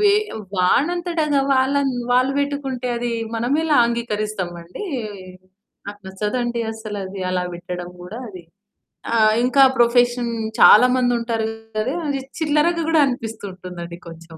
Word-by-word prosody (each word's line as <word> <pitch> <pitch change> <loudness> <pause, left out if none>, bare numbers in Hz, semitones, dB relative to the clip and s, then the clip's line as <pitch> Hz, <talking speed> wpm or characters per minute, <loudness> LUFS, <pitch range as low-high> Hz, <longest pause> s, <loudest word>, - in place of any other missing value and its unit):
వే 410 -1 +5 0.4
వాడంతటగా 305 - +1
వాళ్ళన్ 270 +1 +2 0.2
వాళ్ళు 255 +2 +3
పెట్టుకుంటే 275 -3 -2
అది 240 0 -2 0.2
మనమెలా 290 +7 +1
అంగీకరిస్తామండి. 210 - -4 1.0
నాకు 205 0 -8
నచ్చదండి 235 +5 -2
అస్సలది 205 -3 -6
అలా 180 0 0
పెట్టడం 180 0 -6
కూడా 195 +6 -8
అది. 185 -3 -10 0.7
ఆ! - - +3 0.3
ఇంకా 255 +3 +3 0.2
ప్రొఫెషన్ 240 0 +3 0.3
చాలా 245 +4 +8
మందుంటారు 235 -3 0 0.3
గదా! 245 +8 -1
అది 280 -1 -1 0.2
చిల్లరగా 320 +2 +2
గూడా 320 -2 +4
అనిపిస్తుంటుందండి 185 -8 -6
కొంచెం. 165 0 -12
235 Hz, 110 wpm, -21 LUFS, 195-275 Hz, 1.0 s, చాలా